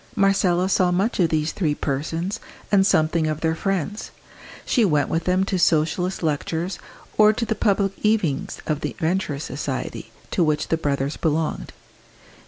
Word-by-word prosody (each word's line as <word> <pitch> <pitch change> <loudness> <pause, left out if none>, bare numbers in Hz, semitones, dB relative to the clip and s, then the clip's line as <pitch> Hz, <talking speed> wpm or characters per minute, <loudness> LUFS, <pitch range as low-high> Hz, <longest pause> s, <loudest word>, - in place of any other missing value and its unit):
Marcella 195 -3 +3
saw 185 -1 +3
much 195 +6 0
of 170 -3 +4
these 155 0 0
three 155 -7 0
persons, 165 +10 -2 0.3
and 195 -1 +5
something 160 -1 +2
of 155 0 -2
their 160 -1 +1
friends. 195 +3 -2 0.6
She 240 - +2
went 150 -8 +2
with 165 +1 -1
them 185 +1 +2
to 195 -1 -1
Socialist 170 +3 +1
lectures, 165 +4 -2 0.4
or 215 0 +8
to 230 - -2
the 220 - 0
public 200 -2 +1
evenings 205 -10 0
of 150 -1 -1
the - - -3
Venturist 160 -3 -1
Society, - - -5 0.2
to 180 - +2
which 155 -1 0
the 165 - +2
brothers 140 -2 -1
belonged. 160 -1 -1
170 Hz, 160 wpm, -23 LUFS, 155-195 Hz, 0.6 s, or